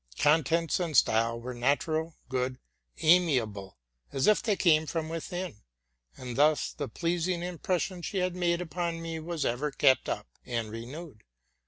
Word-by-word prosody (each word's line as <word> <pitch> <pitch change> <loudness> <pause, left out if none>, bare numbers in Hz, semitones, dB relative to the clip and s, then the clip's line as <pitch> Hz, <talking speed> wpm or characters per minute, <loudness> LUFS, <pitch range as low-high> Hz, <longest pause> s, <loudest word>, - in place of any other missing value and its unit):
Contents 165 +3 +3
and 165 -5 0
style 115 +1 +3
were 125 +2 -6
natural, 155 +6 0
good, 130 0 -1 0.5
amiable, 130 - +3 0.3
as 135 - 0
if 215 - +5
they 215 -3 +1
came 160 -4 +4
from 160 -1 -2
within; 170 - -4 0.6
and 125 -2 -6
thus 150 +1 +3
the 145 - -4
pleasing 175 +1 -1
impression 180 +1 -2
she 195 +3 -4
had 180 -1 0
made 175 -1 +1
upon 170 -1 -3
me 165 -1 -4
was 165 -1 -3
ever 130 +6 0
kept 135 -1 +3
up - - -2 0.2
and 115 -3 -3
renewed. 125 +3 -8
160 Hz, 150 wpm, -29 LUFS, 130-175 Hz, 0.6 s, if